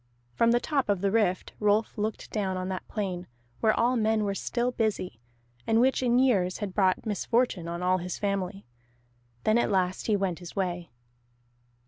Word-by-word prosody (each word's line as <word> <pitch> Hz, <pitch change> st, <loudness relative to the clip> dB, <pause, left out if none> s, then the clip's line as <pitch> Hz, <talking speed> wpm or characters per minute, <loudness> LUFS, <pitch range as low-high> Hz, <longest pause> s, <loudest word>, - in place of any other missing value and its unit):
From 230 Hz, -, +3 dB
the 240 Hz, +1 st, +4 dB
top 275 Hz, -4 st, -1 dB
of 200 Hz, -3 st, +1 dB
the 200 Hz, -1 st, +1 dB
Rift 210 Hz, -4 st, +1 dB
Rolf 210 Hz, +1 st, +2 dB
looked 215 Hz, 0 st, -3 dB
down 190 Hz, -3 st, -1 dB
on 185 Hz, 0 st, -3 dB
that 185 Hz, -1 st, -5 dB
plain 185 Hz, -4 st, -3 dB, 0.3 s
where 220 Hz, -1 st, +2 dB
all 245 Hz, +2 st, +3 dB
men 220 Hz, -1 st, +2 dB
were 200 Hz, -1 st, 0 dB
still 240 Hz, +5 st, -1 dB
busy, 210 Hz, -, -2 dB, 0.5 s
and 225 Hz, 0 st, +3 dB
which 260 Hz, +2 st, +3 dB
in 245 Hz, -1 st, +3 dB
years 200 Hz, -9 st, +3 dB
had 205 Hz, -4 st, -4 dB
brought 190 Hz, -2 st, +2 dB
misfortune 215 Hz, -3 st, 0 dB
on 170 Hz, +1 st, -4 dB
all 185 Hz, +1 st, +2 dB
his 180 Hz, +1 st, -4 dB
family. 200 Hz, -1 st, -2 dB, 0.8 s
Then 215 Hz, +2 st, +3 dB
at -, -, +1 dB
last 185 Hz, -2 st, 0 dB
he 215 Hz, -, +3 dB
went 190 Hz, -4 st, -1 dB
his 175 Hz, -2 st, -10 dB
way. 175 Hz, -3 st, -2 dB
205 Hz, 180 wpm, -28 LUFS, 185-225 Hz, 0.8 s, the